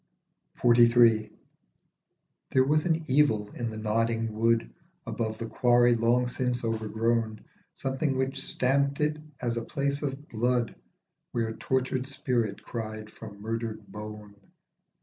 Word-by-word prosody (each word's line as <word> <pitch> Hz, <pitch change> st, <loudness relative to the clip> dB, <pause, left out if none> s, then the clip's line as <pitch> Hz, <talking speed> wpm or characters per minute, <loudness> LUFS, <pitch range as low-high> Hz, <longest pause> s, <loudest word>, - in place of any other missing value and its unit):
47 120 Hz, 0 st, +5 dB
XLIII. 110 Hz, -1 st, -1 dB, 1.2 s
THERE 130 Hz, -, +4 dB
was 150 Hz, +4 st, +2 dB
an 165 Hz, -1 st, +1 dB
evil 130 Hz, -7 st, +2 dB
in 120 Hz, -2 st, -3 dB
the 110 Hz, -, -7 dB
nodding 115 Hz, +1 st, 0 dB
wood 115 Hz, -, +2 dB, 0.4 s
Above 110 Hz, -1 st, -3 dB
the 115 Hz, -, -4 dB
quarry 120 Hz, +1 st, +4 dB
long 120 Hz, +2 st, +2 dB
since 125 Hz, 0 st, -1 dB
overgrown, 110 Hz, 0 st, -1 dB, 0.3 s
Something 135 Hz, +1 st, -1 dB
which 135 Hz, +1 st, -1 dB
stamped 140 Hz, +2 st, +1 dB
it 150 Hz, 0 st, +1 dB, 0.3 s
as 120 Hz, -1 st, 0 dB
a -, -, 0 dB
place 140 Hz, +1 st, -2 dB
of 145 Hz, 0 st, -4 dB
blood 120 Hz, +1 st, 0 dB, 0.6 s
Where 115 Hz, -1 st, -1 dB
tortured 130 Hz, +2 st, -1 dB
spirit 125 Hz, -6 st, -1 dB
cried 110 Hz, -2 st, -6 dB
from 105 Hz, -3 st, -11 dB
murdered 115 Hz, -1 st, -3 dB
bone. 105 Hz, -1 st, -9 dB
120 Hz, 130 wpm, -28 LUFS, 110-130 Hz, 1.2 s, 47